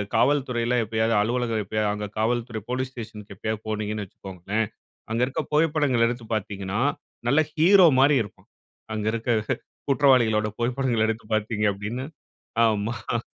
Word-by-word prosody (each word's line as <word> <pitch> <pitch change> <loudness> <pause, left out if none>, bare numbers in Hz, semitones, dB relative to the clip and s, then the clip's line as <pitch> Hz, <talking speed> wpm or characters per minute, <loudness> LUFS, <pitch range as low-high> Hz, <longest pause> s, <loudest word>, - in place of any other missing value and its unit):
காவல்துறையில 125 -2 +2
எப்போயாது 110 +1 0
அலுவலகம் 115 -1 0
எப்போயாது 105 +1 -1
அங்க 105 0 -4
காவல்துறை 115 -1 -1
போலீஸ் 130 +1 -2
ஸ்டேஷனுக்கு 105 -4 -9
எப்போயாது 110 +2 -3
போனீங்கன்னு 105 -1 -2
வச்சுக்கோங்களேன். 95 +4 -4 0.5
அங்க 115 +2 0
இருக்க 135 - -2
புகைப்படங்கள 150 -6 +3
எடுத்து 120 -1 -4
பார்த்தீங்கன்னா, 100 0 -3 0.5
நல்ல 145 +4 +4
ஹீரோ 180 +3 +7
மாரி 140 +1 +5
இருக்கும். 100 - -14 0.5
அங்க 105 -1 -3
இருக்க 115 +1 -1 0.6
குற்றவாளிகளோட 120 -6 +4
புகைப்படங்கள 120 -2 +1
எடுத்து 110 -1 -3
பார்த்தீங்க 105 0 -1
அப்டின்னு 110 +6 -5 0.6
ஆமா. 110 +1 -1
115 Hz, 125 wpm, -25 LUFS, 105-125 Hz, 0.6 s, ஹீரோ